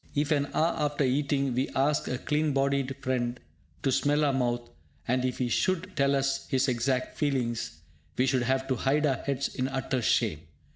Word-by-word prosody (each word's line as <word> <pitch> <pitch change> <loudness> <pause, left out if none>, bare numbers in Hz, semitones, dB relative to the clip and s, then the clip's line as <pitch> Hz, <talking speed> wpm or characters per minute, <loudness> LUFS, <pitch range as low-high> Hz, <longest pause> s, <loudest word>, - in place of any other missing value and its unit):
If, 145 +2 +1
an 145 -2 +2
hour 165 +2 +3
after 145 -1 0
eating, 140 0 +1
we 130 +3 0
ask 140 +2 +2
a 125 - -1
clean 150 +2 0
bodied 135 -1 +1
friend 125 -1 -1 0.4
to 135 - +2
smell 145 +3 +2
our 140 - +2
mouth, 120 -2 0 0.4
and 125 +1 +1
if 130 -1 -1
he 125 - 0
should 185 +8 0
tell 140 0 +3
us 135 0 0
his 135 +1 +2
exact 125 +1 -1
feelings, 120 - -1 0.4
we 125 - +3
should 130 -1 +2
have 130 +2 0
to 130 - +1
hide 145 +4 +2
our 135 -4 +2
heads 140 -1 -2
in 130 0 -1
utter 130 -1 -2
shame! 80 -8 +1
135 Hz, 190 wpm, -28 LUFS, 125-145 Hz, 0.4 s, hour